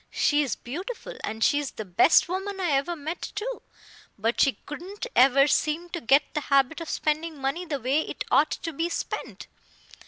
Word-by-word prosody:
She 295 0 +2
is 275 -6 -1
beautiful, 390 - -7
and 220 +1 -2
she 290 - +4
is 290 -2 -3
the 215 - -6
best 185 - +5
woman 385 +2 -4
I 355 -4 0
ever 280 +5 +1
met, 315 +3 -5
too. 480 +4 -4 0.6
But 225 +3 0
she 275 - +4
couldn't 360 - -7
ever 275 +1 +6
seem 305 +4 0
to 345 -1 -5
get 275 +5 +5
the 300 - -1
habit 275 +3 +2
of 330 - -6
spending 310 +1 -1
money 275 +7 -2
the 290 -3 -2
way 265 +5 +1
it - - -4
ought 290 +4 +5
to 330 - -4
be 330 +4 -1
spent." - - -5
300 Hz, 190 wpm, -26 LUFS, 275-345 Hz, 0.6 s, ever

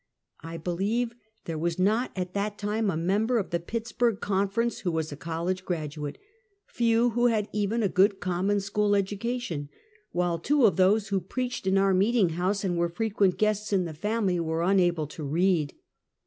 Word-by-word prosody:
I 165 +1 -7
believe 200 +8 -1 0.3
there 160 -2 -4
was 170 +1 -1
not 215 +7 +2
at 180 -1 -4
that 205 +1 -2
time 210 +1 -1
a 165 - -1
member 205 +8 +1
of 200 - -2
the 170 - 0
Pittsburg 230 +3 -1
Conference 200 +4 0
who 180 - -1
was 160 -1 -2
a - - -5
college 170 +4 -3
graduate, 150 -4 -4 0.5
few 235 0 +2
who 240 +2 +3
had 215 -3 +1
even 210 +2 0
a - - +3
good, 195 +1 +3
common 190 +3 0
school 205 +1 +1
educa 205 +5 -1
tion, 150 -11 -5 0.4
while 175 -1 0
two 280 - +3
of 195 -7 +4
those 195 +3 +3
who 195 -2 0
preached 245 +3 -4
in 190 +1 +3
our 195 0 +3
meeting 200 0 +3
house 185 +5 -1
and 175 -3 0
were 170 0 +1
frequent 200 0 +1
guests 215 0 0
in 190 -3 +2
the 165 - -5
family, 200 +1 0
were 165 0 -1
unable 175 -4 +2
to 155 +2 -9
read. 160 0 +1
195 Hz, 185 wpm, -27 LUFS, 170-215 Hz, 0.5 s, of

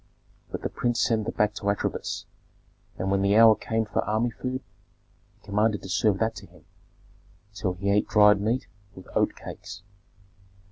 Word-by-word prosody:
But - - -6
the - - -1
prince 120 -1 -1
sent 110 -2 +1
them - - -4
back 105 0 +2
to 100 -1 -2
Atribis; 100 - -2 0.7
and 95 - -2
when 100 0 +2
the 100 +1 +3
hour 115 -1 +8
came 110 +1 -2
for 105 - -1
army 110 +3 0
food, 130 +4 -5 0.7
he - - -28
commanded 105 +1 +1
to 95 - -8
serve 100 +2 +2
that 110 +2 0
to - - -10
him; - - -21 0.9
so 105 -3 -2
he 100 +3 -1
ate 105 +1 +2
dried 105 -1 +5
meat 115 +5 0 0.3
with 95 - -12
oat - - +2
cakes. 90 +2 -9
105 Hz, 175 wpm, -26 LUFS, 100-110 Hz, 0.9 s, hour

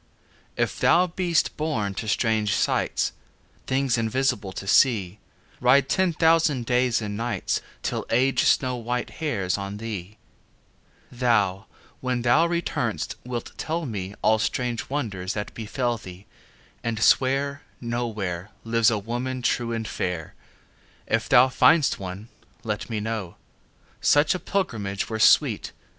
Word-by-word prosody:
If - - -1
thou 180 +2 +5
be'st 175 -1 0
born 140 -11 -1
to 110 - -5
strange 110 -1 +1
sights, - - 0 0.6
Things 130 -2 +1
invisible 115 -3 0
to 95 - -7
see, 100 -4 +3 0.4
Ride 130 +2 +4
ten 190 -1 +2
thousand 160 -6 +3
days 125 -1 +1
and 105 -1 -4
nights 115 +2 -2 0.2
Till - - -2
Age 130 +3 +3
snow 125 -1 +2
white 120 +1 -3
hairs 100 -12 -1
on 100 +1 -5
thee; 105 -2 -6 0.9
Thou, 110 -6 +1 0.3
when 125 -2 -2
thou 150 +8 +4
return'st 170 0 -2
wilt 120 -2 -5
tell 165 +1 -2
me 100 -5 -5
All 110 0 +4
strange 120 +1 -2
wonders 100 -10 -3
that 105 -1 -4
befell 120 +1 -2
thee, 95 +1 -11 0.6
And 115 -2 -2
swear 140 +2 +3 0.2
No 120 0 -2
where 95 -4 -4
Lives 115 -1 +3
a 110 - 0
woman 120 +4 -4
true 120 0 0
and 115 -1 -3
fair. 90 -4 -3 0.7
If 115 0 -1
thou 130 0 +7
find'st 145 +3 +4
one 95 +3 -7 0.3
let 105 0 -3
me 110 -2 -2
know; 105 -4 -4 0.7
Such 145 +1 +4
a 185 - -3
pilgrimage 105 - -2
were 110 - -2
sweet. - - +4
115 Hz, 135 wpm, -25 LUFS, 105-130 Hz, 0.9 s, thou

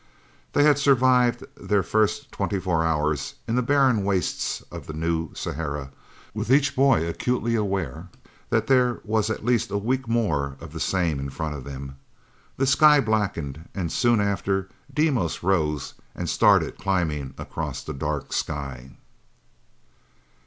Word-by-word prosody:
They 145 - +4
had 145 -1 +5
survived 125 -3 +3
their 100 -2 0
first 110 +9 0
twenty 100 - -2
four 90 -3 0
hours 75 -3 0
in 115 - -1
the 125 - +2
barren 130 -4 +3
wastes 95 -2 -1
of - - -8
the 80 - -6
New 80 0 -1
Sahara, 70 -2 -4 0.4
with - - -4
each 140 +1 +4
boy 130 - +4
acutely 120 +6 -1
aware 95 - -2 0.4
that - - +1
there 125 -2 +3
was 110 0 0
at 110 - -3
least 120 -4 +2
a 100 - -1
week 125 +5 -1
more 75 - 0
of - - -10
the - - -6
same 85 -6 0
in 70 0 -4
front 80 +2 -4
of 70 -3 -8
them. 70 -1 -8 0.6
The 135 - +2
sky 145 +3 +6
blackened, 95 - -2
and 90 -5 -2
soon 120 -2 +3
after 95 -1 0 0.2
Deimos 135 - 0
rose 80 -6 0 0.2
and - - -4
started - - +3
climbing 80 -8 -1
across - - -5
the 75 - -5
dark 75 +1 -3
sky. 65 -3 -4
95 Hz, 150 wpm, -24 LUFS, 75-120 Hz, 0.6 s, sky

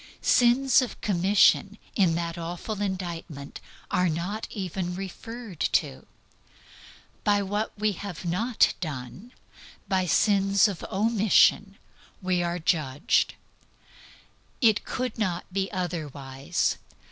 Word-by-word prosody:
Sins 250 +2 +4
of 250 - -5
commission 200 +1 +3 0.2
in 180 -5 +3
that 170 0 -2
awful 175 +5 -5
indictment 175 -7 -5 0.3
are 180 -1 +2
not 180 +7 -3
even 185 -2 -4
referred 200 +1 -8
to. 65 0 0 1.2
By 205 -1 +3
what 205 +3 -2
we 215 +1 +1
have 195 -2 -7
not 215 +8 +2
done, 155 - -6 0.6
by 185 -1 +1
sins 195 +2 +4
of 195 -5 -5
omission, 205 -1 +3 0.4
we 185 -1 0
are 175 0 -1
judged. 155 -4 +1 1.2
It 220 -3 +3
could 255 -2 -3
not 180 -5 -1
be 195 0 -1
otherwise. 145 -8 -2
190 Hz, 105 wpm, -26 LUFS, 170-210 Hz, 1.2 s, Sins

